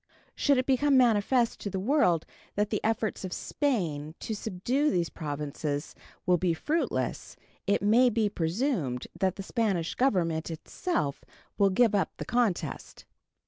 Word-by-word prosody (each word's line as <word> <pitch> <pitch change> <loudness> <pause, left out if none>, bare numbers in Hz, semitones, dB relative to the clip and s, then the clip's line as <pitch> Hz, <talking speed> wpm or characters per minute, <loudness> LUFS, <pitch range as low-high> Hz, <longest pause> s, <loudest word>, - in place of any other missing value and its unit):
Should 280 -2 +2
it 255 - +1
become 275 +1 +3
manifest 235 0 +3
to 205 - -4
the 190 - -3
world 195 - +2 0.3
that 205 0 0
the 210 - -1
efforts 220 -2 -1
of 185 - -4
Spain 170 - -2
to 220 - -3
subdue 225 +8 0
these 175 - 0
Provinces 145 -1 -4 0.3
will 180 -1 +3
be 175 -1 +1
fruitless, 315 - -2 0.3
it 200 0 +2
may 235 +5 +5
be 225 -2 +1
presumed 170 - -1
that 190 -1 +1
the 195 - -6
Spanish 195 -7 0
Government 175 -11 +1
itself 160 - -3 0.4
will 200 -1 +5
give 220 +3 +3
up 200 - 0
the - - -5
contest. 235 -7 -1
205 Hz, 145 wpm, -28 LUFS, 170-245 Hz, 0.4 s, may